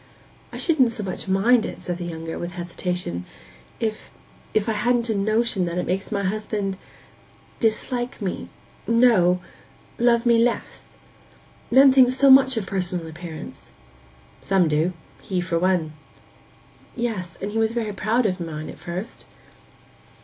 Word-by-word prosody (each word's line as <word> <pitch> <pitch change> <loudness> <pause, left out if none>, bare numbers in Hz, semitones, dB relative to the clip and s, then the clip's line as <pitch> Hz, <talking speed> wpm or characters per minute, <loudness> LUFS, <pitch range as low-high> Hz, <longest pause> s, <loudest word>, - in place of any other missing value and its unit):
'I - - -7
shouldn't 305 -8 +3
so 230 -2 -4
much 190 +1 -4
mind 215 +5 +4
it,' - - -6
said 175 -1 -4
the 175 - -4
younger, 165 -1 -5
with 175 0 -5
hesitation, 175 - -3 0.6
'if—if 215 -1 -4
I - - +2
hadn't 235 +2 +1
a - - +1
notion 215 -1 +1
that 170 0 -3
it 180 - -1
makes 190 +4 -2
my 200 -1 -1
husband—dislike 215 +4 -4
me—no, 200 -1 +1 0.6
love 235 0 +3
me 235 -1 +5
less. 245 - -2 0.8
Men 265 +2 +7
think 260 -2 +6
so 265 +2 +4
much 265 -2 +6
of 215 - -1
personal 180 -3 -2
appearance.' 160 0 -9 0.7
'Some 190 -3 +2
do—he 165 +4 -2
for 175 -1 -1
one.' 175 -4 +1 1.0
'Yes; 215 -8 -3
and 200 - -4
he 225 - -1
was 220 0 +2
very 225 -3 -2
proud 220 +5 +1
of 185 -2 0
mine, 155 -2 -5
at - - -14
first. 180 +6 -6
200 Hz, 135 wpm, -23 LUFS, 180-235 Hz, 1.0 s, Men